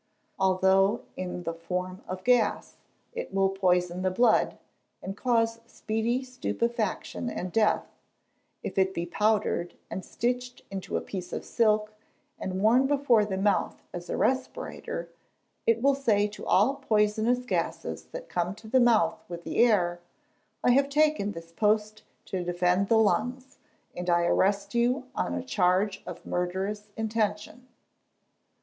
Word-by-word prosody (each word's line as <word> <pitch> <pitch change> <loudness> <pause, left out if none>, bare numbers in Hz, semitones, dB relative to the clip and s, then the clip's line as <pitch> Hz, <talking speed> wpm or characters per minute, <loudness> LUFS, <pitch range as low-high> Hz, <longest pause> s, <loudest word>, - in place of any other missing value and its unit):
Although, 190 +1 +3
in 180 -1 -5
the 165 -1 -3
form 180 +2 -4
of 185 0 -5
gas, 245 -3 +2 0.4
it 485 +1 -5
will 195 0 +2
poison 180 -2 +1
the 185 - +2
blood, 220 +4 +3 0.4
and 195 - -6
cause 230 -1 +1
speedy 230 +4 -1
stupefaction 240 -2 -2
and 185 -5 -4
death; 215 +1 +2 0.8
if - - -2
it 190 0 +2
be 170 - -2
powdered, 210 -2 0 0.2
and 190 - -4
stitched 245 +1 -3
into 195 -1 -3
a - - -2
piece 180 -2 -6
of - - -4
silk, 215 -2 +2 0.5
and 190 +1 -3
worn 245 +5 +5
before 270 -7 +3
the 190 -2 -3
mouth 200 0 0
as 175 0 -7
a - - -2
respirator, - - -2 0.6
it 230 +1 +3
will 280 0 +5
say 220 -7 +2
to 210 - -9
all 250 +9 +3
poisonous 220 0 +1
gases - - -2
that - - -8
come 175 +2 -2
to 220 - -13
the 260 +4 +3
mouth 225 -3 +3
with 170 -1 -7
the - - -5
air, 175 -7 +2 0.6
"I - - +5
have 275 +2 +3
taken 300 -8 +2
this 165 0 -10
post 215 +3 +1 0.2
to 185 -2 -3
defend 180 +2 +1
the 225 - +4
lungs, 250 +4 0 0.4
and 180 0 -4
I 170 0 +3
arrest 200 +3 +1
you, 245 +3 +2
on - - -1
a - - -3
charge 190 -3 +1
of 180 - -8
murderous 190 +4 -2
intention." 220 +2 -2
210 Hz, 145 wpm, -28 LUFS, 185-240 Hz, 0.8 s, worn